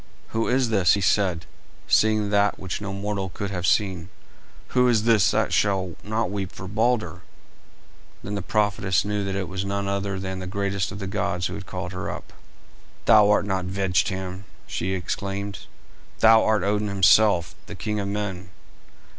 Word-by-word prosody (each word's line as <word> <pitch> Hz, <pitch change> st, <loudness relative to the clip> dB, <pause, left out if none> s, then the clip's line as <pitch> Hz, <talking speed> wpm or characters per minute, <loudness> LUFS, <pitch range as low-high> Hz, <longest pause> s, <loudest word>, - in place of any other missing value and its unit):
"Who 115 Hz, 0 st, -1 dB
is 125 Hz, -1 st, +2 dB
this," 100 Hz, -5 st, +4 dB
he 100 Hz, -, +1 dB
said, 90 Hz, -3 st, +1 dB, 0.4 s
seeing 110 Hz, -1 st, +3 dB
that 100 Hz, 0 st, +2 dB
which 95 Hz, +1 st, -5 dB
no 100 Hz, -1 st, -4 dB
mortal 100 Hz, -1 st, -3 dB
could 100 Hz, +2 st, -5 dB
have 90 Hz, -2 st, -2 dB
seen; 95 Hz, -3 st, +1 dB, 0.6 s
"who 125 Hz, 0 st, +3 dB
is 115 Hz, -3 st, +3 dB
this 110 Hz, -5 st, +4 dB
that -, -, +1 dB
will 95 Hz, -4 st, -2 dB
not 110 Hz, -1 st, -1 dB
weep 95 Hz, -3 st, -3 dB
for 95 Hz, -, -9 dB
Balder?" 110 Hz, -4 st, 0 dB, 1.0 s
Then 100 Hz, -, -5 dB
the 100 Hz, -, -2 dB
prophetess 100 Hz, -1 st, +1 dB
knew 105 Hz, 0 st, -1 dB
that 95 Hz, -1 st, -3 dB
it 95 Hz, -1 st, -2 dB
was 95 Hz, +1 st, -4 dB
none 100 Hz, 0 st, -2 dB
other 100 Hz, -1 st, -2 dB
than 95 Hz, -1 st, -4 dB
the 95 Hz, -, -6 dB
greatest 100 Hz, -1 st, -2 dB
of 95 Hz, -, -6 dB
the 100 Hz, -, -5 dB
gods 95 Hz, -3 st, -2 dB
who -, -, -3 dB
had 95 Hz, -, -8 dB
called 90 Hz, 0 st, -5 dB
her 90 Hz, -, -4 dB
up. -, -, -8 dB, 0.7 s
"Thou 105 Hz, -1 st, +6 dB
art 105 Hz, -1 st, +3 dB
not 95 Hz, -2 st, -1 dB
Vegtam," 95 Hz, 0 st, -1 dB, 0.2 s
she 95 Hz, +2 st, -3 dB
exclaimed, 100 Hz, +2 st, -4 dB, 0.5 s
"thou 110 Hz, 0 st, +6 dB
art 110 Hz, -3 st, +2 dB
Odin 105 Hz, +1 st, 0 dB
himself, 100 Hz, -2 st, +4 dB
the -, -, -8 dB
king 105 Hz, -1 st, -3 dB
of 100 Hz, -, -2 dB
men." 100 Hz, -2 st, -4 dB
100 Hz, 175 wpm, -24 LUFS, 95-105 Hz, 1.0 s, Thou